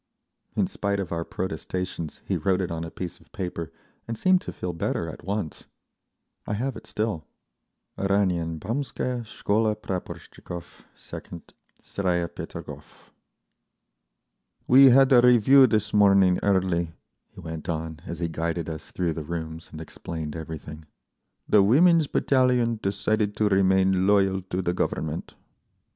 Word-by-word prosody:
In - - +2
spite 100 -1 -2
of 95 - -4
our 85 -1 -1
protestations 90 -1 -4
he - - -1
wrote 95 -1 +1
it 90 -3 -2
on 80 0 -3
a 85 - -5
piece 90 +1 -7
of - - -24
paper, 90 -6 -4 0.4
and 115 -1 -4
seemed 185 +5 +3
to - - -6
feel 90 -1 -5
better 85 - -2
at - - -9
once. 100 -3 -4 0.8
I - - -1
have 130 +3 -2
it - - -11
still—"Oranien 90 - -3
baumskaya 125 - -3
Shkola 110 -1 0
Praporshtchikov 90 -3 -7
2nd, 85 - -10 0.3
Staraya 90 -3 -1
Peterhof." - - -10 1.6
"We 135 +2 +8
had 135 +1 +6
a 120 - +8
review 125 +2 +7
this 105 -2 0
morning 100 -3 +5
early," 90 -4 +1 0.3
he - - -16
went 80 +1 -7
on, 80 -1 -3
as 85 - -5
he 85 - -1
guided 85 0 -3
us 80 - -8
through 85 -3 -1
the 80 - -5
rooms 80 0 -6
and 80 - -8
explained 80 -1 -6
everything. 80 -1 -8 0.6
"The 105 - +5
Women's 155 - +5
Battalion 125 -5 +2
decided 105 +1 0
to 105 -1 +2
remain 95 -1 +3
loyal 95 -2 +3
to 95 +1 -2
the 90 - 0
Government." 80 -3 -3
95 Hz, 140 wpm, -25 LUFS, 85-110 Hz, 1.6 s, We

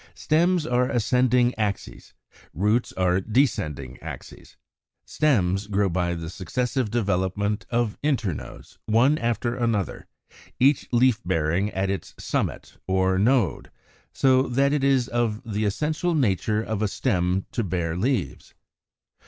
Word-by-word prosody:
= - - -43
Stems 170 +1 +2
are 125 +1 +1
ascending 125 0 +2
axes; 105 -2 -4 0.4
roots 105 +7 +1
are 90 0 +1
descending 85 - -1
axes. - - -10 0.5
Stems 100 -10 +1
grow 100 -1 +1
by 85 0 -1
the 85 -1 -6
successive 115 +8 -2
development 100 -1 -1
of 120 -3 -1
internodes 120 - -3
(13), 110 - 0
one 135 +6 +4
after 120 +1 -1
another, 115 - -2 0.5
each 135 +2 +3
leaf 120 -2 +3
bearing 85 +3 0
at 95 -1 -1
its 100 - -5
summit - - -3
(or 95 0 +2
node); 120 +4 +1 0.4
so 130 -1 +3
that 140 +3 +2
it 145 -2 0
is 135 -3 +3
of 120 -4 -1
the 110 -1 -2
essential 155 - -1
nature 110 - +1
of 110 -2 -3
a 110 - +2
stem 95 -4 0
to 115 - -1
bear 85 -3 -2
leaves. 115 - -2
110 Hz, 135 wpm, -24 LUFS, 95-125 Hz, 0.5 s, one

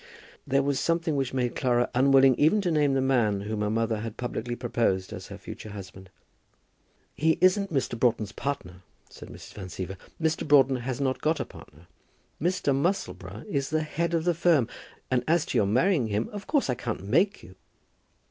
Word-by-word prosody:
There 135 0 +2
was 140 -1 0
something 165 -2 0
which 135 -2 -1
made 125 -2 -1
Clara 120 -2 +2
unwilling 135 +1 +5
even 160 +8 +4
to 180 -3 0
name 145 -3 +2
the 135 - +2
man 115 -7 +2
whom 105 +1 -3
her 105 - 0
mother 115 0 0
had 110 0 -6
publicly 120 -1 -3
proposed 115 -6 -1
as - - -8
her - - -9
future 110 - -9
husband. 95 -2 -10 1.0
"He 160 +1 +2
isn't 195 +2 +3
Mr. 130 -5 -1
Broughton's 110 -4 +1
partner," 95 -10 -5 0.3
said - - -11
Mrs. - - -11
Van 95 -3 -7
Siever. 95 +2 -6 0.2
"Mr. 160 -1 0
Broughton 135 -2 +5
has 125 +1 -4
not 130 -2 -1
got 155 +1 +1
a - - -2
partner. 80 +4 -15 0.6
Mr. 170 -5 +1
Musselboro 180 +8 -2
is 140 -8 -1
the 155 0 0
head 170 +2 -1
of 165 - 0
the 175 0 +2
firm. 165 -7 +3 0.4
And 125 -1 +2
as 165 0 +3
to - - -1
your 100 - +2
marrying 130 - +2
him, 105 +1 -1
of 205 -1 -8
course, 290 -3 +1
I 125 - +1
can't 120 -4 -4
make 170 - +1
you." 95 - -13
130 Hz, 190 wpm, -27 LUFS, 110-160 Hz, 1.0 s, unwilling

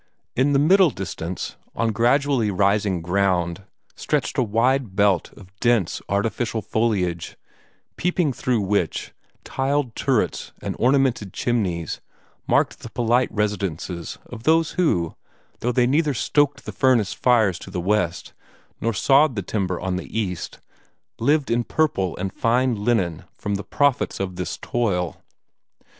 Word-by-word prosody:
In 135 +3 +3
the - - +4
middle 180 +5 +5
distance, 95 - -5 0.2
on 115 -1 +1
gradually 120 +1 +2
rising 100 -2 +1
ground, 90 0 0 0.3
stretched - - -1
a - - +5
wide 120 0 +1
belt 100 -3 +2
of 95 -1 -16
dense, 120 -7 +1
artificial 110 +2 -1
foliage, 90 -7 -1 0.6
peeping 175 -4 +1
through 125 -2 0
which 100 -4 -1 0.3
tiled 135 -3 -1
turrets - - 0
and - - -4
ornamented 130 -6 +2
chimneys 95 -9 -1 0.5
marked - - +2
the - - -9
polite 120 +1 +1
residences 95 -5 -3
of 120 -2 -9
those 160 +4 +3
who, 90 - +1 0.5
though 120 - 0
they 125 0 +3
neither 145 +2 +2
stoked 145 +2 +1
the - - -5
furnace 125 -6 +2
fires 110 -8 +2
to - - -10
the - - -4
west, 90 -2 -1 0.5
nor 115 +1 0
sawed 140 +4 +4
the 100 -4 -3
lumber 95 -4 0
on 95 0 -2
the 105 +4 -4
east, 90 -6 -4 0.6
lived 145 +3 +2
in 120 +1 +2
purple 105 - 0
and 95 -1 -3
fine 125 +2 +2
linen 100 -6 0
from 105 - -3
the 100 0 -2
profits 145 -2 +1
of 95 -2 -3
this 90 -2 -4
toil. 90 -8 -1
110 Hz, 140 wpm, -23 LUFS, 95-130 Hz, 0.6 s, middle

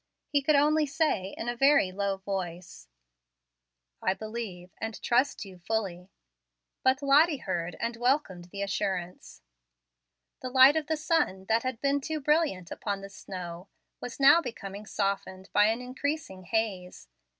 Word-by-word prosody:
He 285 - +2
could 295 +2 +3
only 300 +1 +3
say 280 - 0
in 225 - -5
a 240 - -1
very 270 -6 +4
low 200 0 -1
voice, 180 - -6 1.1
"I 190 - +1
believe 215 -5 -6
and 225 -1 -4
trust 250 -1 +1
you 185 -2 -12
fully." 185 -2 -3 0.7
But 260 +2 +2
Lottie 295 +3 +5
heard 170 0 -2
and 230 0 -2
welcomed 240 -8 0
the 200 +3 -5
assurance. 180 - -4 1.0
The 255 - -4
light 260 +3 +7
of 315 -2 -1
the 315 0 0
sun, 295 - 0
that 225 +1 +3
had 255 -2 -3
been 280 0 +1
too 315 +2 -3
brilliant 295 - +1
upon 200 -2 -3
the 195 - -8
snow, 180 -2 -8 0.3
was 245 +2 -7
now 280 +5 +7
becoming 210 - -7
softened 195 -2 -3
by 205 +1 +6
an 225 +3 0
increasing 255 - -4
haze. 190 - -2
220 Hz, 150 wpm, -29 LUFS, 190-275 Hz, 1.1 s, light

